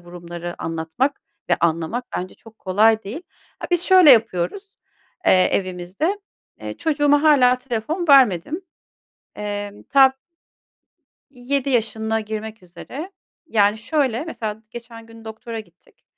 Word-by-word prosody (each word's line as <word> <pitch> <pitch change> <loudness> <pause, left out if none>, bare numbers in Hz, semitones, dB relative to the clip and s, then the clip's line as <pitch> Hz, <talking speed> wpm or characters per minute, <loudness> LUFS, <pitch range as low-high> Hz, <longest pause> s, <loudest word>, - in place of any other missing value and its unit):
vurumları 175 0 -8
anlatmak 165 - -2 0.3
ve 175 - +4
anlamak 170 +8 -1
bence 185 +1 -5
çok 225 -1 -18
kolay 215 +4 +3
değil. 230 - -7 0.4
A - - -7
biz 350 -1 +2
şöyle 365 -4 +7
yapıyoruz, 230 - +1 0.5
eee, 185 -1 +5
evimizde 185 - -2 0.6
çocuğuma 290 -2 +2
hâlâ 255 -5 +5
telefon 270 +8 -4
vermedim. 270 - +4 0.8
Eee, 205 -1 -4 0.2
ta 270 -1 +6 1.2
7 275 +1 -2
yaşına 225 -2 0
girmek 220 0 -7
üzere. 275 - -9 0.3
Yani, 210 -5 +2
şöyle, 260 +1 -1
mesela, 220 -9 -6
geçen 230 -1 -11
gün 225 0 -15
doktora 220 +1 -7
gittik. 175 -5 -22
225 Hz, 115 wpm, -21 LUFS, 195-275 Hz, 1.2 s, şöyle